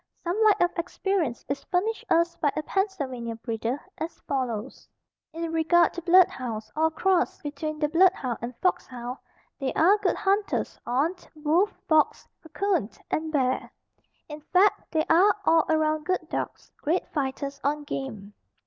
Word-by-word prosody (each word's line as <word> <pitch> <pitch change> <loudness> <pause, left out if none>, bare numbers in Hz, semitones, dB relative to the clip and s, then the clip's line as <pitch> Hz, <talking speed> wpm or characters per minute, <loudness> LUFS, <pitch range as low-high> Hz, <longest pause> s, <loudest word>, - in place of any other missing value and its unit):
Some 345 +1 -1
light 420 -2 +5
of 350 0 +1
experience 350 -6 -1
is 280 0 -3
furnished 400 +5 -1
us 335 +1 +3
by 290 - +1
a 310 - -2
Pennsylvania 280 - -2
breeder, 230 +3 -3 0.2
as 325 +1 -5
follows: 255 -3 -3 0.4
In 330 +1 -4
regard 330 +1 +3
to 345 - -5
blood 360 +2 +6
hounds 225 -4 -6
or 315 +1 +3
a - - -1
cross 360 +3 +1
between 305 +1 -4
the 300 0 +1
blood 355 +4 +5
hound 250 -8 -4
and 240 +1 -5
fox 365 - +1
hound, 245 0 -6 0.4
they 270 -2 -1
are 390 +6 +4
good - - +1
hunters 400 +1 0
on 275 +8 +1 0.2
wolf, 315 +7 +2 0.2
fox, 315 -2 +2 0.2
'coon 365 - 0 0.2
and 315 0 -1
bear. 260 -3 0 0.6
In 300 0 -8
fact, 370 +6 +2
they 315 -1 +1
are 380 +5 +5
all 325 -1 +4
around 310 0 +1
good 370 0 -1
dogs, - - -5
great 335 +5 0
fighters 280 0 -3
on 295 +1 0
game. 240 -9 -6
310 Hz, 160 wpm, -26 LUFS, 270-355 Hz, 0.6 s, blood